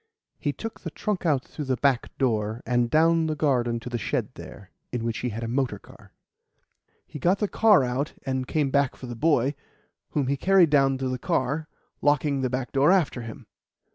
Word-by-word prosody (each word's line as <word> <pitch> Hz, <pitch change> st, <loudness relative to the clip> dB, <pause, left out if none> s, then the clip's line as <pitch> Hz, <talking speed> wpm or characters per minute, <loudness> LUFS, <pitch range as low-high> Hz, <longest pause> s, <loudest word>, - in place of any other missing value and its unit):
He 145 Hz, -, -1 dB
took 225 Hz, +9 st, -7 dB
the -, -, -5 dB
trunk 205 Hz, -5 st, -3 dB
out 140 Hz, -4 st, +1 dB
through 150 Hz, -, -7 dB
the 130 Hz, -1 st, 0 dB
back 135 Hz, -1 st, 0 dB
door 110 Hz, -3 st, -1 dB
and 120 Hz, -1 st, +1 dB
down 165 Hz, +3 st, +3 dB
the 155 Hz, -, -1 dB
garden 125 Hz, -6 st, +1 dB
to -, -, -9 dB
the 120 Hz, -1 st, -3 dB
shed -, -, -2 dB
there, 100 Hz, -2 st, -12 dB, 0.2 s
in 120 Hz, -2 st, -3 dB
which 115 Hz, -3 st, -2 dB
he 125 Hz, -, -2 dB
had 115 Hz, +1 st, -5 dB
a -, -, -3 dB
motor 130 Hz, +2 st, -1 dB
car. -, -, -17 dB, 0.9 s
He 150 Hz, -, -9 dB
got 180 Hz, +8 st, +2 dB
the 210 Hz, -, 0 dB
car 210 Hz, -7 st, +4 dB
out 130 Hz, +4 st, -2 dB
and 130 Hz, -2 st, -2 dB
came 145 Hz, -4 st, 0 dB
back 140 Hz, -2 st, +2 dB
for -, -, -10 dB
the 120 Hz, -1 st, -6 dB
boy, 140 Hz, -1 st, +2 dB, 0.6 s
whom 145 Hz, -3 st, +1 dB
he 140 Hz, +2 st, 0 dB
carried 185 Hz, -1 st, +4 dB
down 135 Hz, -2 st, +4 dB
to 130 Hz, 0 st, -2 dB
the 130 Hz, 0 st, -3 dB
car, 140 Hz, +6 st, -1 dB, 0.3 s
locking 145 Hz, -1 st, +2 dB
the 130 Hz, -, 0 dB
back 125 Hz, 0 st, -3 dB
door 140 Hz, +5 st, +4 dB
after 165 Hz, -10 st, +2 dB
him. 115 Hz, -1 st, -9 dB
135 Hz, 205 wpm, -25 LUFS, 125-150 Hz, 0.9 s, car